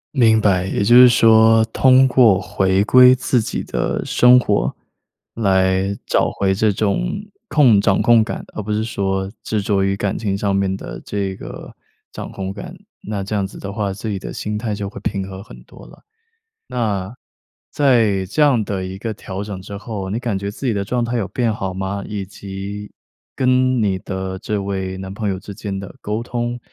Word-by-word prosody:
明 110 -4 +4
白， 95 -4 +2
也 95 - -1
就 120 +4 +4
是 125 0 +10
说， 115 -2 +5
通 130 +2 +5
过 120 -6 +5
回 95 0 +1
归 125 +3 +7
自 125 0 +1
己 - - -4
的 - - -2
生 125 +1 +5
活， 105 -5 +1 0.6
来 95 -2 +1
找 - - +1
回 95 -1 0
这 105 +3 +2
种 100 - 0 0.5
控 130 - +5
掌 100 -1 +2
控 120 -1 +5
感 110 - -3
的， - - -22
而 110 - -1
不 105 +1 -3
是 105 +1 0
说 95 -3 -2
执 110 -2 -2
着 100 -1 0
于 95 0 +1
感 100 0 -2
情 100 -3 -2
上 100 -1 -1
面 95 -1 0
的 - - -8
这 100 -2 -3
个 - - -9 0.4
掌 - - -7
控 95 -1 -5
感。 100 +1 -8 0.3
那 105 -2 -3
这 100 - -6
样 100 -2 0
子 - - -13
的 100 - -6
话， 100 -2 -2
自 105 +3 -6
己 100 -2 -3
的 - - -7
心 105 0 -4
态 110 -1 -3
就 100 -1 -4
会 - - -9
平 100 -2 -3
和 95 0 -8
很 105 - -13
多 - - -15
了。 - - -17 0.6
那， 105 -4 -2 0.6
在 115 -9 +2
这 110 +11 -2
样 140 -6 +4
的 95 -2 -3
一 95 +1 -6
个 110 +2 -4
调 95 -1 -7
整 100 -2 -6
之 100 +1 -8
后， 100 -3 -6
你 105 +4 -2
感 115 -5 -2
觉 100 +1 -4
自 120 - -8
己 115 - +1
的 100 -1 -1
状 120 +3 -1
态 120 - -3
有 110 - -1
变 120 -3 0
好 95 -3 -4
吗？ 95 +1 -4
以 100 -2 -5
及， 100 +1 -8 0.5
跟 130 -1 +2
你 100 -3 +1
的 95 0 -5
这 105 -1 -3
位 95 -1 -3
男 95 0 -7
朋 105 0 -2
友 95 -1 -3
之 100 +1 -9
间 100 -3 -5
的 95 -1 -9
沟 105 +2 -3
通， 120 0 -3
100 Hz, 220 characters per minute, -19 LUFS, 95-115 Hz, 0.6 s, 是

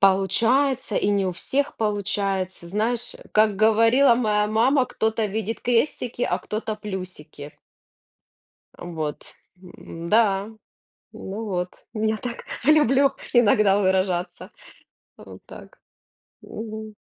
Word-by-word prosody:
получается 225 +6 +2
и - - +1
не 200 -1 +1
у 185 - 0
всех 270 +11 -2
получается, 195 -4 -2
знаешь, 220 +5 -2 0.2
как 215 -1 +3
говорила 230 +5 +4
моя 210 -3 +1
мама 245 +6 +3
кто-то 220 -2 -1
видит 220 +2 -4
крестики, 245 0 0
а, - - 0
кто-то 215 0 -4
плюсики. 180 -8 -8 1.2
Э, - - -10
вот, 160 -4 -5 0.4
м-да. 195 +3 -1 0.6
Ну 205 +4 -7
вот, 180 -4 -2 0.3
я 220 0 0
так 240 +1 -7 0.2
люблю 275 -2 +4 0.2
иногда 210 -4 +4
выражаться. 185 -2 -1 0.7
Вот - - -13
так. - - -13 0.6
Мгм. 220 -1 -8
215 Hz, 105 wpm, -23 LUFS, 190-230 Hz, 1.2 s, говорила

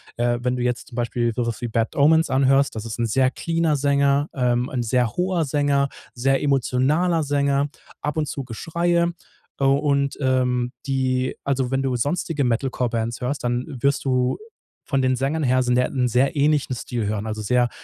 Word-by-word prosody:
Äh, 120 0 0
wenn 125 0 0
du 125 - -2
jetzt 125 -1 -2
zum 120 - -12
Beispiel 120 -1 -1
sowas 115 -1 -2
wie 120 - -3
Bad 115 0 -1
Omens 160 +2 +4
anhörst, 135 +1 +3
das 110 - -5
ist 115 +1 -6
ein 120 - +1
sehr 130 +4 +2
cleaner 165 +1 0
Sänger, 140 +1 +2
ähm, 125 -1 0
'n 125 - -2
sehr 120 0 +1
hoher 180 -1 +1
Sänger, 140 -1 +1 0.2
sehr 135 +2 +1
emotionaler 145 +5 +1
Sänger, 140 0 +1 0.3
ab 150 - -3
und 155 -1 -1
zu 140 - -5
Geschreie. 170 +7 0 0.5
Äh, - - -1
und, 140 0 +2
ähm, 125 -2 +1
die 130 -2 0
also, 135 -2 0
wenn 135 0 +1
du 135 -2 -1
sonstige 145 +3 -1
Metal 125 +2 0
Core 125 -1 -1
Bands 115 0 -2
hörst, 130 +3 -2
dann 120 +1 -1 0.2
wirst 140 +2 +1
du 125 -1 +1 0.5
von 135 -3 0
den 130 0 +2
Sängern 140 +5 -1
her 130 -1 +3
sind 125 0 +1
ja, 125 - +3
'n 125 -2 0
sehr 125 +5 +2
ähnlichen 145 -2 +1
Stil 120 -1 -4
hören, 105 0 -2
also, 110 0 -4
sehr, 120 +3 +2
130 Hz, 190 wpm, -22 LUFS, 125-140 Hz, 0.5 s, Omens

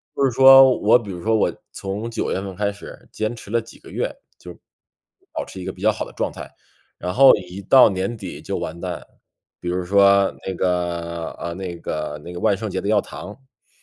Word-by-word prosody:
就 140 - +2
是 130 - +2
说， 135 +1 +8
我 110 +4 +5
比 105 -4 -8
如 90 -2 -8
说 110 0 +2
我 110 - +1 0.2
从 100 +4 -5
九 115 - -2
月 95 - -1
份 95 -2 -7
开 100 +1 -1
始， 100 - -12
坚 110 +2 -2
持 110 - -12
了 115 0 +1
几 115 - -15
个 - - -15
月， - - -2 0.2
就， 90 - -11 0.8
保 - - -4
持 95 - -9
一 - - -7
个 95 - -3
比 95 - -15
较 110 - +4
好 110 - -4
的 - - -12
状 - - -2
态， - - -10 0.5
然 90 - -4
后 135 +1 +8
一 90 0 -8
到 125 +6 +7
年 95 +4 -3
底 95 -4 -8
就 - - -4
完 85 - -5
蛋。 90 -1 -5 0.6
比 - - -6
如 90 +1 -1
说 100 +1 +4
那 95 - -2
个 85 -2 -2
呃， 85 - -4
那 90 -1 -6
个 75 -2 -5
那 85 - -8
个 90 - -6
万 100 - +2
圣 110 +1 -4
节 95 - -3
的 100 - -4
要 105 -1 +4
糖， - - -9
是 130 +4 -21
100 Hz, 245 characters per minute, -21 LUFS, 90-110 Hz, 0.8 s, 说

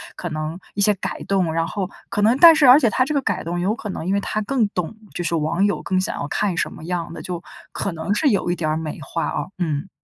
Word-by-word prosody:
可 175 - -5
能 155 +2 -4 0.2
一 200 - -1
些 210 +1 +5
改 195 - -5
动， 190 -4 +1
然 165 +1 0
后， 185 +3 -3 0.2
可 205 - -1
能 230 +5 +4
但 335 0 +9
是 295 -4 +5
而 255 +4 +9
且 250 - +3
他 255 - +3
这 295 +3 -2
个 280 - +2
改 - - -1
动， 175 +1 -3
有 195 +5 0
可 215 -3 -7
能 170 - -5
因 190 - 0
为 200 - +2
他 215 - -2
更 240 -2 +1
懂， 180 +1 -3 0.2
就 175 - -2
是 170 0 -2
网 165 +5 +1
友 205 - 0
更 185 -1 0
想 185 - -2
要 145 - -3
看 195 +2 -1
什 - - 0
么 - - -11
样 175 -1 -3
的， - - -7
就 175 -2 -5 0.3
可 200 - -3
能 160 +5 -2
是 280 +8 +1
有 200 -6 +1
一 175 - 0
点 155 -3 -2
儿 155 - 0
美 160 -1 -5
化 165 +4 -3
啊， - - -2
嗯。 165 0 -2
185 Hz, 305 characters per minute, -22 LUFS, 165-210 Hz, 0.3 s, 但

